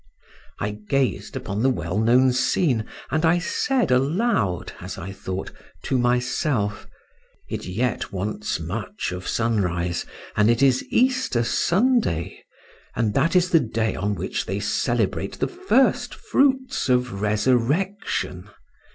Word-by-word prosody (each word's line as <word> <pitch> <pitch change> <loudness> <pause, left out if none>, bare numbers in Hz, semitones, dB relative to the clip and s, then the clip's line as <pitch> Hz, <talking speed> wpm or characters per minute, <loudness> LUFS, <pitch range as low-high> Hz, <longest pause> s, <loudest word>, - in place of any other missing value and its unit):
I 105 - -1 0.2
gazed 135 -2 0
upon 105 +1 -3
the 130 - +4
well 90 -4 -1
known 125 +3 +4
scene, 130 -2 +1 0.3
and 155 +1 +1
I 165 +1 +4
said 245 - 0
aloud 135 - +1
(as - - -6
I 95 +3 -6
thought) 95 -1 -5 0.3
to 130 - 0
myself, 125 -3 0 0.6
"It - - -5
yet 110 +6 -2
wants 100 0 -3
much 95 - -4
of 90 +1 -6
sunrise, 90 -7 0 0.3
and 105 +1 +4
it 120 +3 +3
is 130 -2 +4
Easter 255 - +2
Sunday; 190 - +1 0.5
and 110 -3 0
that 165 - +2
is 180 0 +3
the 165 - +6
day 110 -4 -1
on 100 +2 -1
which - - -3
they 95 +2 -2
celebrate 105 -1 0
the - - 0
first 360 -8 +1
fruits 265 - +1
of 125 -5 +1
resurrection. 115 - 0
120 Hz, 130 wpm, -23 LUFS, 100-165 Hz, 0.6 s, the